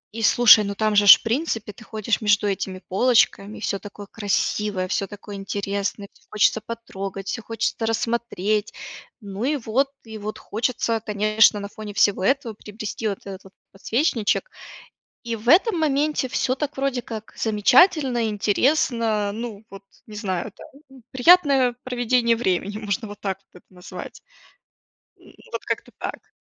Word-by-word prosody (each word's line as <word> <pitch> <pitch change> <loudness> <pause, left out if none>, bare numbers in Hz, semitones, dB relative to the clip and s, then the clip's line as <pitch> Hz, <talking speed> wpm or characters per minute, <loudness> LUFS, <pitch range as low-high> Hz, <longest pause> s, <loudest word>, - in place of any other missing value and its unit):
и 225 - -4
слушай, 220 -1 +7
ну 200 - -3
там 215 +1 0
же 205 0 +5
ж - - +12
в - - -22
принципе 225 -3 -2
ты 220 - -15
ходишь 220 0 -2
между 205 -1 +2
этими 195 -1 -3
полочками, 215 -1 +2
и - - -14
всё 200 -2 -2
такое 205 0 -10
красивое, 205 -1 -1
всё 195 - -1
такое 205 +1 -10
интересное, 200 +1 -3
всё - - -27
хочется 215 +1 +2
потрогать, 195 -4 -7
всё 230 - -3
хочется 225 0 -2
рассмотреть. 225 -2 -1 0.5
Ну 200 +2 -6
и 295 +3 +1
вот, 260 +3 0 0.2
и 220 -1 -8
вот 210 +1 -5
хочется, 230 0 -1
конечно, 215 0 +3
на 200 - -5
фоне 215 -1 -8
всего 205 -2 +2
этого 270 -2 0
приобрести 215 +1 -5
вот 200 - -6
этот 190 -1 -8
вот 195 - -16 0.2
подсвечничек, 230 - 0 0.8
и 230 - -1
в 225 +2 -9
этом 380 - +6
моменте 295 -2 0
всё 255 0 0
так 295 +1 -4
вроде 270 -2 -1
как 220 -2 -8
замечательно, 255 - +3
интересно, 215 -1 +1
ну 220 -1 -7
вот, 195 0 -11 0.2
не 215 - -10
знаю 195 -1 -3
там, 270 -2 -16
приятное 270 -3 +4
проведение 245 -1 +1
времени, 200 -2 -1
можно 215 +1 -3
вот 205 0 -10
так 195 -2 -3
вот 180 - -16
это - - -54
назвать. 180 +2 -10 1.0
М, - - -18 0.2
вот - - -5
как-то - - -4
так. - - -7
220 Hz, 160 wpm, -23 LUFS, 205-245 Hz, 1.0 s, ж